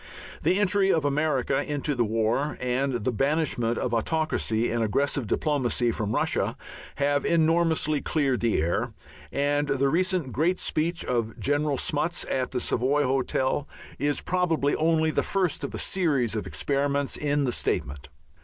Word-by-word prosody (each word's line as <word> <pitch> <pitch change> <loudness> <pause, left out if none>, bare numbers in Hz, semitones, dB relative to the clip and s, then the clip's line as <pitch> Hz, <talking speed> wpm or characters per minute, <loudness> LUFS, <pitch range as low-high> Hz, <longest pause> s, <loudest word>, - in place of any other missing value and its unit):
The 185 - +2
entry 200 -1 +3
of 160 -3 +1
America 140 -2 +1
into 145 0 -2
the 120 -3 +1
war 115 +6 0
and 130 +2 0
the 130 - +1
banishment 135 -3 0
of 120 - -2
autocracy 120 -3 0
and 115 0 0
aggressive 135 +3 0
diplomacy 130 -5 +1
from 105 -2 -2
Russia - - 0 0.4
have 145 0 +1
enormously 160 -2 +2
cleared 140 -5 0
the 115 -2 +1
air, 80 +3 -1 0.4
and 145 +1 +1
the 140 0 +1
recent 180 -3 0
great 160 +10 +1
speech 170 +3 -1
of 115 -3 -2
General 145 0 0
Smuts 155 +6 -1
at 130 -1 0
the 125 - -2
Savoy 135 +5 +1
Hotel 130 +1 0 0.3
is 145 0 0
probably 165 -5 +1
only 160 0 +2
the - - +1
first 190 -4 0
of - - -3
a - - -3
series 140 - 0
of 110 - -3
experiments 140 0 0
in 145 -1 0
statement. 70 - -2
145 Hz, 150 wpm, -26 LUFS, 125-155 Hz, 0.4 s, entry